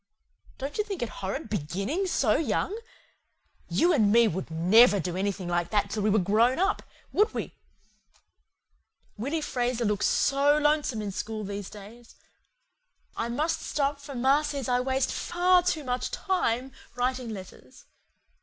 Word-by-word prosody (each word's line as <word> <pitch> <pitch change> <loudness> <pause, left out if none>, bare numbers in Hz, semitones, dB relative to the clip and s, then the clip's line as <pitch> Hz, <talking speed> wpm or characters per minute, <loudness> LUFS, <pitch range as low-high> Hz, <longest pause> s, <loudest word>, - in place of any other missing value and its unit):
Don't 280 +8 -5
you - - +3
think 395 - -4
it 235 - -3
horrid 200 +9 -3
BEGINNING 205 - -2
SO 245 -11 +2
YOUNG? 350 +5 0 0.9
YOU 345 +1 +3
AND 215 -9 +3
ME 235 +1 +6
would 185 +2 -4
NEVER 195 +6 +5
do 180 0 -3
anything 195 -1 -2
like 175 0 -1
that 210 -2 0
till 215 - -2
we 210 - +2
were 210 - +3
GROWN 215 +6 +3
UP, 385 +4 +1 0.3
would 425 +3 +3
we? - - -4 1.6
Willy 280 +9 -2
Fraser 245 -4 -1
looks 210 -1 +1
SO 285 +2 +3
LONESOME 295 -7 +1
in 205 - -3
school 215 +2 -4
these 200 -1 -5
days. 220 +4 -13 1.0
I 230 - -2
must 305 +7 -1
stop 280 -1 -1
for 280 -1 -9
ma 265 +4 +3
says 285 -4 -4
I 250 -1 +2
waste 265 +1 0
FAR 360 +1 +3
TOO 345 -4 -1
MUCH 250 -1 -2
TIME 270 - -1 0.2
writing 250 0 -1
letters. 185 -11 -11
245 Hz, 155 wpm, -27 LUFS, 205-290 Hz, 1.6 s, ME